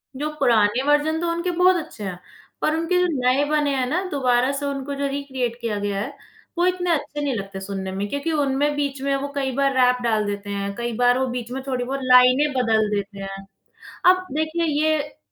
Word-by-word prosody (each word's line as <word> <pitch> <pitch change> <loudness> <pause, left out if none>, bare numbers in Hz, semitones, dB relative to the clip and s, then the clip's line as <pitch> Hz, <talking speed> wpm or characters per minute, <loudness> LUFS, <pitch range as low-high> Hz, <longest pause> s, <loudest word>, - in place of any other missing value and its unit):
जो 300 +3 -2
पुराने 230 +2 +3
वर्ज़न 300 +2 +2
तो 340 - 0
उनके 340 +1 -1
बहुत 370 0 +6
अच्छे 210 - -11
हैं, 180 -2 -5 0.4
पर 310 - +1
उनके 335 +2 0
जो - - +2
नए 255 +3 +3
बने 295 -2 +1
हैं 255 -1 0
ना, 355 +8 0
दोबारा 255 -1 +2
से 285 +1 -3
उनको 280 0 -3
जो 280 0 -1
रिक्रिएट 265 -4 -3
किया 220 -3 -2
गया 200 -1 -2
है, - - -6 0.4
वो 350 - +3
इतने 360 -1 0
अच्छे 295 -1 -2
नहीं 280 -3 0
लगते 195 -1 -5
सुनने 190 -1 -5
में 200 +2 -3
क्योंकि 285 +3 -2
उनमें 290 0 +1
बीच 280 -2 -2
में 275 0 0
वो 275 +1 -2
कई 270 -2 -1
बार 275 0 +2
रैप 250 -1 +4
डाल 220 -3 +1
देते 205 0 -4
हैं। 200 0 -3
कई 240 0 -3
बार 245 0 +4
वो 265 - +1
बीच 245 -1 -5
में 265 +1 -4
थोड़ी 255 -2 -1
बहुत 270 +2 -3
लाइनें 255 +3 +5
बदल 220 -4 +2
देते 200 0 -4
हैं। 195 0 -6 0.7
अब 370 0 +2
देखिए, 315 +3 -1
ये 305 -1 0
270 Hz, 215 wpm, -22 LUFS, 230-295 Hz, 0.7 s, बहुत